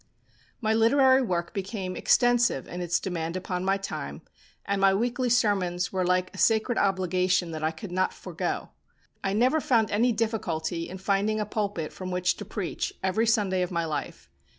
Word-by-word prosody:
My 220 -1 +2
literary 260 +4 +5
work 175 -7 -2
became 195 -2 -4
extensive 240 - +3
in 180 - -6
its 175 0 +1
demand 170 -2 -3
upon 180 0 -3
my 195 +1 +2
time, 195 - -6 0.4
and 200 0 -1
my 195 0 +5
weekly 245 +4 0
sermons 195 -7 +1
were 185 -1 +1
like 180 0 +1
a - - -9
sacred 225 +2 +2
obligation 185 -2 +1
that 155 -1 -5
I 155 - +2
could 165 +4 -8
not 185 +1 +1
forego. - - -4 0.5
I 195 - 0
never 255 +9 +3
found 225 -6 +2
any 235 +4 +3
difficulty 175 -8 -2
in 185 - -7
finding 200 +3 0
a 210 - -1
pulpit 200 -6 -3
from 185 -1 -6
which 180 0 +1
to 205 - -7
preach 195 -3 -3
every 190 +5 +1
Sunday 205 -5 +2
of 180 - -1
my 170 -2 -1
life. 155 -2 -5
195 Hz, 175 wpm, -27 LUFS, 180-220 Hz, 0.5 s, literary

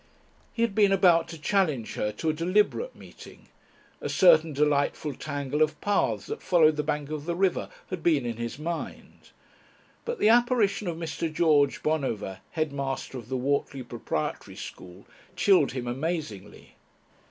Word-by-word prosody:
He 230 - -1
had 230 -3 0
been 205 -1 +4
about 180 -3 +4
to 165 - -8
challenge 150 - 0
her 105 - -1
to 155 +9 -1
a - - -5
deliberate 205 - +1
meeting. - - -14 0.5
A - - -3
certain 165 -3 +5
delightful 145 0 0
tangle 145 +1 -3
of 155 0 +2
paths 115 - 0
that - - -6
followed 160 -4 +4
the 150 - 0
bank 150 0 -3
of 155 -1 -4
the 170 0 -2
river 190 0 0 0.2
had 185 -3 -4
been 155 -6 +2
in 115 -2 -3
his 115 +2 -5
mind. 165 +2 -6 0.7
But 475 0 -3
the 215 - +3
apparition 235 -4 +3
of 170 -2 -3
Mr. 165 -1 -3
George 155 -3 +2
Bonover, 130 -11 -2
headmaster 140 -4 -3
of 115 -1 -13
the 130 - -1
Whortley 135 0 -1
Proprietary 120 -10 -4
School, 90 +2 -10 0.3
chilled 185 -7 +4
him 125 -2 -4
amazingly. 120 - -5
155 Hz, 155 wpm, -27 LUFS, 135-175 Hz, 0.7 s, certain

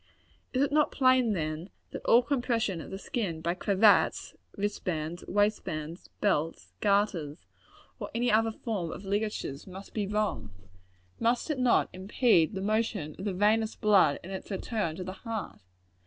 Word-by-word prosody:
Is 260 +1 +2
it 285 - 0
not 300 0 +3
plain, 255 -4 +4
then, 155 +1 -3 0.2
that - - -6
all 240 +2 +6
compression 235 - 0
of - - -9
the 190 - -5
skin 195 -6 -3
by 170 +2 -1
cravats, 200 +3 +3 0.2
wristbands, 175 -5 -3
waistbands, 180 -5 -1
belts, 165 -5 0
garters, 200 -7 0 0.5
or - - -5
any 240 +1 +2
other 225 +1 +3
form 210 -6 -4
of 195 - -8
ligatures, 200 -8 -3
must 190 +1 -10
be 210 -3 -1
wrong! 210 - -1 0.7
Must 240 +6 +1
it 285 - -2
not 250 -1 +3
impede 190 -2 +2
the 190 - -3
motion 210 -6 -1
of 190 - -5
the 200 - -1
venous 215 +3 +2
blood 195 -9 +4
in 185 - -8
its 190 - -6
return 200 -4 -2
to 185 - -5
the 185 +1 -6
heart? 225 -3 -5
205 Hz, 155 wpm, -29 LUFS, 175-225 Hz, 0.7 s, all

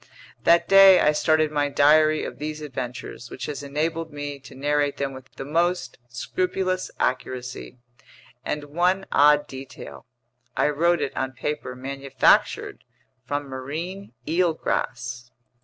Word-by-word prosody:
That 170 0 +5
day 195 -1 +8
I 150 - +4
started 155 0 +2
my 145 -1 0
diary 155 +2 +4
of - - -7
these 155 +1 -4
adventures, 130 -4 -6
which - - -6
has 145 -2 -5
enabled 160 +3 -2
me 145 -1 -6
to 135 - -14
narrate 145 +1 0
them 140 -1 -2
with 130 -1 -12
the - - -6
most 165 -3 0
scrupulous 185 +9 -2
accuracy; 125 0 -3 0.7
and 150 0 -3
one 180 +6 0
odd 150 0 +5
detail: 130 - -10 0.5
I - - +3
wrote 170 +4 +2
it - - -4
on 130 0 -2
paper 130 -1 -4
manufactured 135 +1 +1 0.4
from 145 +2 -1
marine 155 +9 -6
eelgrass. 125 -8 -1
145 Hz, 130 wpm, -24 LUFS, 130-165 Hz, 0.7 s, day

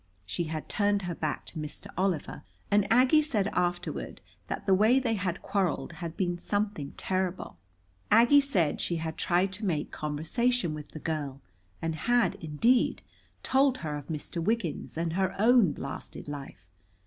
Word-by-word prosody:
She 170 - -2
had 155 -1 -5
turned 205 -1 +1
her 175 -1 -2
back 155 -2 -3
to 160 - -8
Mr. 150 -1 -6
Oliver, 180 -5 -1 0.3
and 205 0 +3
Aggie 255 +6 +6
said 215 -10 0
afterward 175 -2 -2 0.3
that - - -4
the 195 - +4
way 220 +7 +5
they 240 -4 0
had 185 -4 -2
quarreled 190 -7 0
had 165 0 -7
been 175 -2 -1
something 205 -9 -2
terrible. 185 -1 -2 0.5
Aggie 240 +6 +7
said 185 - +1
she 170 - -1
had 160 -1 -3
tried 185 +2 +1
to 205 - -3
make 155 -5 -1
conversation 165 +7 0
with 150 -1 -8
the 155 - -6
girl, 145 -4 -3 0.4
and 165 0 0
had, 240 +9 +2
indeed, 230 +12 +2 0.4
told 265 0 +3
her 150 -1 -2
of 145 -2 -7
Mr. 165 +1 -4
Wiggins 190 -7 -2
and 165 0 -1
her 190 +1 0
own 225 -5 +5
blasted 140 0 -7
life. 140 -10 -8
180 Hz, 160 wpm, -29 LUFS, 155-215 Hz, 0.5 s, Aggie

